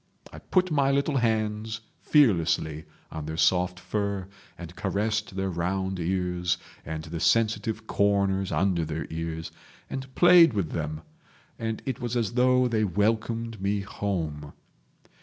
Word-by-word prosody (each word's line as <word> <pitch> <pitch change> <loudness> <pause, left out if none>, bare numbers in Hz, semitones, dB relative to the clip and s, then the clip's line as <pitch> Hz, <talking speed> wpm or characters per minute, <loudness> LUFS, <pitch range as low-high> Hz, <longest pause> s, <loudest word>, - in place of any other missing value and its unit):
I - - -8
put 185 -1 +1
my 140 -3 +3
little 140 +1 +1
hands 110 -1 -1 0.2
fearlessly 85 - +2 0.3
on 75 -2 -6
their 80 0 -4
soft 90 +1 +2
fur, 100 +1 -2 0.3
and 85 0 -9
caressed 105 +1 -1
their 95 0 -1
round 95 +2 -2
ears 90 0 0 0.3
and 80 +1 -5
the 80 +1 -6
sensitive 110 +1 +1
corners 100 -2 +1
under 90 -3 +1
their 80 0 -3
ears, 80 0 -4 0.4
and 135 0 -5
played 175 -4 +7
with 95 -7 -1
them, 75 -1 -3 0.6
and 115 -1 -3
it 130 -4 -3
was 120 0 -1
as 115 -2 -1
though 125 +1 +4
they 110 -2 +1
welcomed 110 +3 0
me 100 +1 0
home. 80 -8 -4
100 Hz, 140 wpm, -27 LUFS, 85-115 Hz, 0.6 s, played